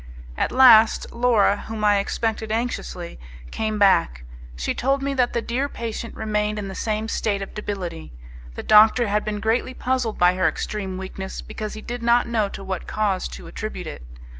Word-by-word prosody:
At - - -1
last 235 -4 +6
Laura, 235 -4 +2
whom 220 -1 -5
I 205 -1 +4
expected 220 +2 -2
anxiously, 220 - -3 0.3
came 215 -1 -2
back; 65 - +3 0.3
she - - -2
told 275 +2 0
me 280 0 -1
that 250 -2 +1
the 235 - -1
dear 265 +4 -1
patient 230 -1 -6
remained 210 -1 -1
in 200 -2 -4
the - - -6
same 215 +2 -2
state 205 -3 -1
of - - -10
debility; 185 -6 -5 0.4
the - - -6
doctor 215 +2 +6
had 210 +1 +1
been 210 -1 -3
greatly 230 +4 0
puzzled 255 -4 -1
by 180 0 +4
her 185 -2 +1
extreme 190 +3 -4
weakness 190 0 -6
because 215 -1 -6
he 215 - -8
did 240 +1 -6
not 235 +1 +3
know 220 -4 0
to 195 - -8
what 190 -2 -5
cause 205 -3 -1
to - - -10
attribute - - -6
it. - - -7
215 Hz, 185 wpm, -23 LUFS, 195-235 Hz, 0.4 s, last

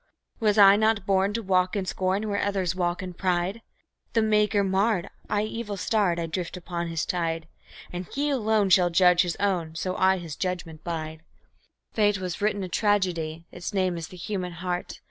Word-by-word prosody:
Was 215 -2 +2
I 200 -1 +8
not 220 -2 +2
born 195 0 +2
to 230 +1 -2
walk 185 -1 +2
in 195 -2 -1
scorn 190 +3 -1
where 205 -1 -1
others 195 -4 0
walk 175 0 -1
in 180 -1 -6
pride? 185 +4 -1 0.5
The 225 - +3
Maker 210 -1 +3
marred, 195 0 +1 0.2
and, 210 +1 0
evil 215 -2 -5
starred, 190 -3 +1
I 170 - -1
drift 170 +2 -4
upon 170 -1 -4
His 165 -2 -2
tide; 165 -2 -2 0.5
And 180 0 -5
He 290 +1 -1
alone 220 -6 +1
shall 180 -1 +6
judge 180 0 +5
His 175 -2 -1
own, 175 -5 -1
so 185 +2 -2
I 190 0 +3
His 170 -4 -7
judgment 170 -4 -4
bide. 160 -2 -5 0.7
Fate 210 -2 +3
has 185 0 -4
written 205 -1 0
a - - -3
tragedy; 175 -5 0
its 180 +4 -6
name 185 -2 +1
is 165 -1 -5
"The 180 - -12
Human 180 -1 -4
Heart". 175 +1 -4
185 Hz, 185 wpm, -26 LUFS, 175-205 Hz, 0.7 s, I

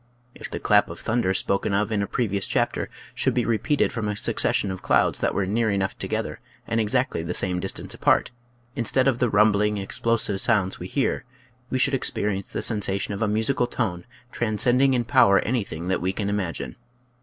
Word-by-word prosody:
If - - -9
the - - -5
clap - - +3
of - - -8
thunder 110 -4 0
spoken 100 +1 0
of 105 +2 0
in 105 -2 0
a 100 - -2
previous 100 -5 -1
chapter - - -1 0.2
should - - 0
be 120 -2 +1
re 115 -2 +1
peated 150 -2 +1
from 115 -3 -3
a 105 - -2
succession 100 -1 0
of 95 - -6
clouds - - +2
that - - 0
were 100 - +1
near 110 +4 0
enough 95 -2 -1
together - - -3 0.3
and 115 0 0
exactly 125 -3 0
the 85 +2 -4
same 90 -1 +1
distance 95 - -2
apart, - - +2 0.4
instead 130 +3 +1
of 125 -3 +1
the 125 - +2
rumbling, 105 0 +3
ex 95 - -3
plosive 110 -4 +1
sounds 100 -5 +1
we 90 - -6
hear 135 +7 -1 0.5
we 130 - -1
should 135 +2 +2
experience 105 -6 -1
the - - -3
sensation 100 -2 0
of 100 - -5
a 115 - +2
musical 110 +4 +1
tone 90 -10 -3 0.3
transcending 120 +4 +2
in 120 - +1
power 120 -7 +5
anything 100 -8 -3
that 95 - 0
we 95 +2 0
can 100 0 -2
imagine. 100 -5 -3
105 Hz, 200 wpm, -24 LUFS, 100-120 Hz, 0.5 s, power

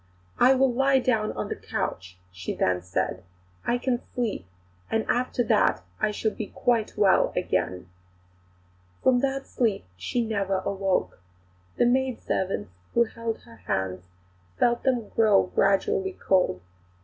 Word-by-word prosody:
"I 260 +2 +6
will 260 -1 +3
lie 270 +2 +3
down 225 -5 +1
on 105 - -4
the - - -2
couch," 90 0 -4
she 90 0 -5
then 90 -1 +1
said. 90 0 -2 0.5
"I 240 - +2
can 245 -1 -1
sleep, 220 - -2 0.4
and 225 0 0
after 245 0 +1
that 210 - +2 0.2
I - - +2
shall 215 +1 -1
be 215 - -5
quite 230 -4 0
well 200 -2 +4
again." 90 - -1 1.2
From 255 -1 +5
that 275 +1 -1
sleep 220 - 0
she 235 - -1
never 195 -3 0
awoke. 195 - -1 0.6
The - - +4
maidservants 245 - 0 0.2
who 235 - +6
held 230 0 -5
her 115 - -16
hands 90 -2 -3 0.5
felt 240 0 +2
them 245 -5 0
grow 210 -4 +3
gradually 380 - +2
cold. 180 - +1
215 Hz, 135 wpm, -26 LUFS, -, 1.2 s, I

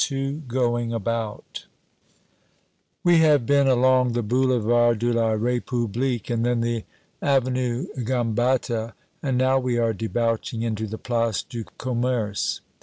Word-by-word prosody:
XXII 135 +1 -2
Going 120 -1 0
About 115 -1 -4 1.4
WE 175 -2 +5
have 150 -6 +4
been 140 +2 +3
along 130 -1 +3
the 120 0 -1
Boulevard 120 -1 +2
de 120 +2 0
la 115 -1 +2
Republique 120 +1 -1
and 115 -1 0
then 120 -1 +1
the 115 -2 -2 0.4
Avenue 130 -2 +1 0.2
Gambetta, 120 -1 0 0.3
and 135 -4 0
now 130 +1 +3
we 125 -2 -1
are 115 -1 +1
debouching 115 +1 -2
into 110 -1 -2
the 110 +2 -6
Place 115 -5 -1
du 120 -3 -7
Commerce. 120 -4 -1
120 Hz, 125 wpm, -24 LUFS, 115-130 Hz, 1.4 s, WE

